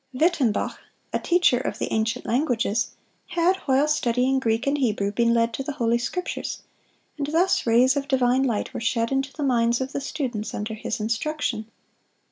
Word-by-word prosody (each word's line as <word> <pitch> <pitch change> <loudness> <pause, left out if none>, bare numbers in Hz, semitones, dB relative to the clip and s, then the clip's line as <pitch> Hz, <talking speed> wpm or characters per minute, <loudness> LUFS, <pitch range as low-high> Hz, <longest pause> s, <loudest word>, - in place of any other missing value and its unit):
Wittembach, 285 -7 +1 0.3
a - - +1
teacher 350 -8 +3
of - - -3
the - - -3
ancient 225 +3 -1
languages, 235 -3 0 0.4
had, 350 +2 +2
while 270 +2 +3
studying 260 -2 +1
Greek 225 -1 0
and 285 +1 +1
Hebrew, 210 -6 0
been 235 +2 +2
led 230 0 +2
to 270 - -3
the 295 - -4
Holy 235 -3 +1
Scriptures, 360 +9 -4 0.6
and 285 - -1
thus 330 -1 +2
rays 250 +4 +5
of 280 -1 -2
divine 260 -1 +2
light 240 -6 -1
were - - -4
shed 230 +1 0
into 270 +1 0
the 295 - -5
minds 235 -3 +2
of 260 +1 -3
the 280 - -3
students 255 -6 -4
under 210 +2 -4
his 220 +1 -4
instruction. 230 +1 -2
250 Hz, 175 wpm, -24 LUFS, 230-280 Hz, 0.6 s, rays